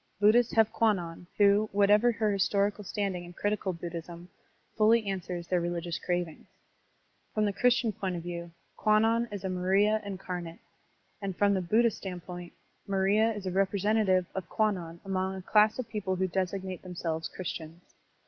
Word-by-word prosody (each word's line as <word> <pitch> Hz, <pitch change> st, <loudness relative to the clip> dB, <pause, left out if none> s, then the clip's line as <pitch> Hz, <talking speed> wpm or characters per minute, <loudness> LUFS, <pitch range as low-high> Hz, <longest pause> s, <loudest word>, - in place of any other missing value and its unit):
Buddhists 225 Hz, +3 st, +4 dB
have 225 Hz, -1 st, +3 dB
Kwannon, 175 Hz, -6 st, 0 dB
who, 205 Hz, +1 st, +4 dB
whatever 205 Hz, +4 st, +4 dB
her 215 Hz, -2 st, 0 dB
historical 200 Hz, +1 st, +1 dB
standing 195 Hz, -2 st, -2 dB
in 175 Hz, 0 st, -11 dB
critical 205 Hz, 0 st, -1 dB
Buddhism, 170 Hz, 0 st, -7 dB, 0.5 s
fully 220 Hz, +1 st, +4 dB
answers 180 Hz, -3 st, -4 dB
their 180 Hz, 0 st, 0 dB
religious 170 Hz, 0 st, -3 dB
cravings. 175 Hz, -3 st, -3 dB, 0.9 s
From 215 Hz, -1 st, +2 dB
the 205 Hz, -, 0 dB
Christian 240 Hz, 0 st, +2 dB
point 195 Hz, -3 st, -3 dB
of 170 Hz, -, -5 dB
view, 170 Hz, -1 st, -5 dB, 0.3 s
Kwannon 225 Hz, +2 st, +3 dB
is 205 Hz, -2 st, -6 dB
a 190 Hz, -, -2 dB
Maria 195 Hz, +4 st, +2 dB
incarnate; 180 Hz, -4 st, -6 dB, 0.6 s
and 195 Hz, -3 st, -4 dB
from 205 Hz, 0 st, +3 dB
the 190 Hz, -, +1 dB
Buddhist 220 Hz, +5 st, +2 dB
standpoint, 180 Hz, -2 st, -7 dB, 0.4 s
Maria 200 Hz, +3 st, +2 dB
is 205 Hz, -2 st, -7 dB
a 185 Hz, -, -1 dB
represen 200 Hz, +3 st, +2 dB
tative 185 Hz, -2 st, +3 dB
of 190 Hz, -, -5 dB
Kwannon 180 Hz, -6 st, -1 dB
among 190 Hz, 0 st, -1 dB
a 190 Hz, -, -6 dB
class 215 Hz, +2 st, +4 dB
of 255 Hz, -3 st, -4 dB
people 210 Hz, -4 st, -2 dB
who 185 Hz, +1 st, 0 dB
designate 185 Hz, 0 st, -3 dB
themselves 170 Hz, -3 st, -4 dB
Christians. 170 Hz, -1 st, -7 dB
195 Hz, 160 wpm, -29 LUFS, 175-210 Hz, 0.9 s, Buddhists